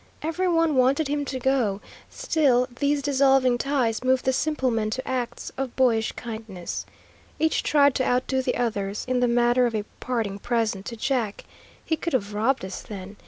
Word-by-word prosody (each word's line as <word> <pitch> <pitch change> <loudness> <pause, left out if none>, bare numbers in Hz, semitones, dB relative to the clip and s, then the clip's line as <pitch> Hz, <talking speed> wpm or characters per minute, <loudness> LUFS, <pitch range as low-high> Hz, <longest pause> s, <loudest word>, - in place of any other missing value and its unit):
Every 330 +4 -1
one 330 -3 +2
wanted 275 +4 +3
him 290 0 -1
to 260 -1 -4
go, 250 -6 +1 0.3
still 290 - +2
these 285 0 +1
dissolving 270 -3 +3
ties 255 -5 0
moved 260 0 +2
the 260 - +2
simple 275 -2 0
men 220 -2 0
to 255 +4 -4
acts 250 -2 -3
of 270 -2 -3
boyish 230 -4 +2
kindness. 220 -6 -6 0.5
Each 320 0 +1
tried 285 -2 +4
to 260 - 0
outdo 260 +1 +1
the 255 -1 -1
others, 205 -4 -2
in 255 -1 +1
the 245 - +3
matter 240 +1 +3
of 230 - -3
a 210 -1 -2
parting 220 -6 -2
present 225 -4 -1
to 235 - -5
Jack. 230 -4 -1 0.4
He 320 - 0
could 335 - -4
have 205 -5 -1
robbed 225 +1 +1
us 190 - -6
then. 200 -1 -9
255 Hz, 180 wpm, -25 LUFS, 225-275 Hz, 0.5 s, tried